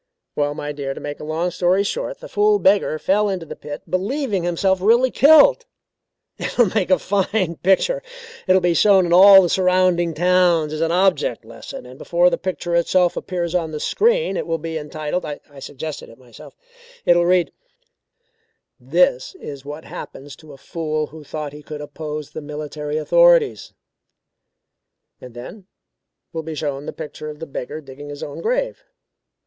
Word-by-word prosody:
"Well, 145 0 -1
my 145 0 -5
dear, 140 -2 -5
to - - -7
make 145 0 -6
a - - -8
long 160 +4 -2
story 180 +3 +2
short, - - -4
the - - -8
fool 420 0 +2
beggar 195 - +2
fell 205 +5 +1
into 185 -4 -3
the - - -8
pit, 145 0 -8
believing 200 - -1
himself 180 +2 0
really 240 +5 +4
killed. 315 - +6 0.7
It - - -5
will 235 -7 +4
make 205 -5 0
a 185 - +5
fine 195 -3 -1
picture. 475 - +2 0.5
It 185 - +5
will 190 - +4
be 175 -1 +2
shown 190 0 +4
in 170 - 0
all 195 +1 +9
the - - +1
surrounding 180 -2 +2
towns 175 -3 +2
as 155 - -4
an 165 0 +1
object 180 - +1
lesson, 115 +1 -10
and 125 +1 -13
before 175 +1 +2
the - - -1
picture 175 -2 -4
itself 175 +1 +2
appears 175 -3 -3
on 170 -3 0
the 155 -1 -5
screen 475 - +1
it - - -4
will 165 -1 -1
be 165 +1 -6
entitled 155 +2 -4
I 150 -1 -6 0.2
suggested 145 +3 -7
it 115 - -15
myself 125 -2 -15 0.5
it 175 - +5
will 175 0 +2
read 180 -1 +2 1.3
'This - - +1
is 140 - -9
what 150 +2 -8
happened 140 +1 -9
to 155 -2 -14
a - - -13
fool 155 +1 -3
who 155 +1 -13
thought 150 0 -6
he 150 - -10
could 150 0 -8
oppose 150 0 -7
the 155 - -7
military 150 0 -5
authorities,' 170 -7 +3 1.5
and 125 -2 -12
then 185 - -10 0.7
will 165 - -3
be 160 0 -7
shown 145 -1 -4
the - - -3
picture 155 -1 -8
of 150 - -8
the 165 - -7
beggar 145 +1 -6
digging 145 +1 -11
his 145 0 -7
own 145 - -7
grave. - - -2
170 Hz, 180 wpm, -20 LUFS, 150-190 Hz, 1.5 s, all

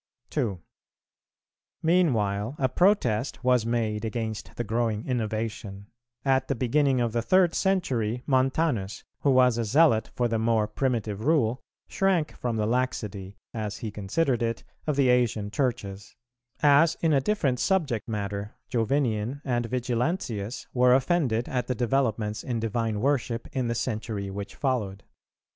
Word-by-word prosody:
2. 115 - -1 1.2
Meanwhile 120 - +2
a 130 - +2
protest 130 - +1
was 125 -3 +3
made 110 -2 -1
against 110 -1 -4
the 120 - -2
growing 115 -1 -1
innovation: 110 -4 -3 0.3
at 135 -1 +2
the 140 - 0
beginning 135 +2 +2
of 120 -2 +1
the 115 +1 0
third 180 +7 +3
century 125 - 0
Montanus, 130 -5 0 0.2
who 145 - +1
was 125 -3 +4
a - - +1
zealot 115 -1 +3
for 120 - +1
the 115 -1 -1
more 110 -1 +2
primitive 110 -3 -2
rule, 130 -5 +2 0.3
shrank 190 -5 +1
from 120 -2 -2
the 110 -1 0
laxity, 105 -5 -2 0.2
as 105 -3 -4
he 110 - -5
considered 120 +6 0
it, 115 -1 -1 0.2
of 150 - +1
the 135 -2 +3
Asian 115 -4 +1
Churches;[385:1] 120 +2 -4
as, 150 +3 +5
in 160 -2 +3
a 135 - +4
different 140 -8 0
subject 145 - 0
matter, 100 -1 -4 0.2
Jovinian 120 0 0
and 120 -3 0
Vigilantius 120 - -2
were 125 0 +5
offended 130 -4 +1
at 125 -2 -2
the 125 - -1
developments 115 -4 0
in 120 -2 -2
divine 115 -1 -1
worship 125 -4 0
in 130 -2 -1
the 115 - -1
century 110 -4 -3
which 100 +2 -6
followed. 110 -8 -2
120 Hz, 145 wpm, -27 LUFS, 110-135 Hz, 1.2 s, as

